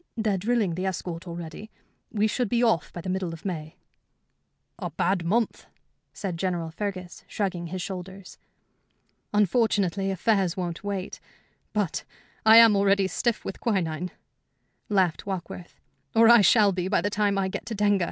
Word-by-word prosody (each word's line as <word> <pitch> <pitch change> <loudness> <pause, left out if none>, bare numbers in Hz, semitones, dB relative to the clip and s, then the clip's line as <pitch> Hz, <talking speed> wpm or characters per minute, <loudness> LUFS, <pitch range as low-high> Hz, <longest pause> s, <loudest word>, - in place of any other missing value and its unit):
They're 220 -3 +1
drilling 205 -1 0
the 185 +3 -2
escort 175 -1 -4
already. 170 +5 -7 0.4
We 210 -1 +1
should 230 +1 0
be 240 +2 +2
off 225 -9 +2
by 175 - -7
the 185 - -5
middle 185 -2 -2
of 165 - -11
May." 160 -5 -5 1.0
"A - - -3
bad 180 0 0
month," 220 +7 0 0.4
said 185 -4 -5
General 170 -2 -2
Fergus, 185 0 -5
shrugging 185 -4 -3
his 185 +1 -4
shoulders. 190 0 -8 0.9
"Unfortunately, 200 -2 +2
affairs 195 -1 +1
won't 175 -1 -4
wait. 200 -2 -4 0.5
But 205 -7 -1 0.4
I 220 +1 +9
am 230 -2 +8
already 200 0 +3
stiff 235 +3 -1
with 195 - -5
quinine," 180 -6 -1 0.8
laughed 190 -4 +1
Warkworth 180 -2 -6 0.4
"or 225 0 +7
I 235 -2 +8
shall 205 +1 +5
be 180 -1 -2
by 190 - +2
the 205 +3 -1
time 205 -1 +1
I 195 -1 +1
get 190 - -6
to 225 - -4
Denga. 205 -1 +2
195 Hz, 155 wpm, -26 LUFS, 180-210 Hz, 1.0 s, I